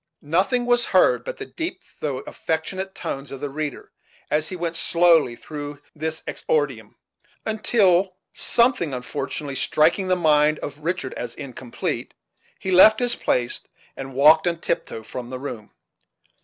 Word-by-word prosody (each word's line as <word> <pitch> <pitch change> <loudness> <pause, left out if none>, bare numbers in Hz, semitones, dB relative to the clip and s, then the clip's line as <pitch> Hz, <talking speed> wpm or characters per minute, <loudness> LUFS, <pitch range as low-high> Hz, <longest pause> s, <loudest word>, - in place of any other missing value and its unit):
Nothing 190 - +1
was 245 0 +3
heard - - +4
but - - -6
the - - -6
deep 360 +2 -5 0.2
though 135 -3 -2
affectionate 190 +7 -3
tones 135 +1 -5
of 135 - -6
the 145 0 -4
reader, 150 -1 -5 0.4
as 155 +1 +1
he 185 - -5
went 170 -1 -3
slowly 165 -8 +4
through 145 +2 -7 0.2
this 160 +1 -4
exordium; 135 -9 -1 0.5
until, 195 -4 +2 0.2
something 235 - +2
unfortunately 140 +3 -4
striking 160 +7 +2
the 185 - +3
mind 155 -3 +3
of 145 +1 -7
Richard 170 -5 -2
as 120 -1 -6
incomplete, 130 -3 -5 0.4
he 190 - -3
left 215 +4 +8
his 245 -1 +1
place 120 -1 0 0.3
and 135 -1 -7
walked 155 +5 +6
on 170 -1 0
tiptoe 110 - -3
from 120 +2 -7
the 130 - -5
room. 120 -6 -7
155 Hz, 145 wpm, -23 LUFS, 140-185 Hz, 0.5 s, left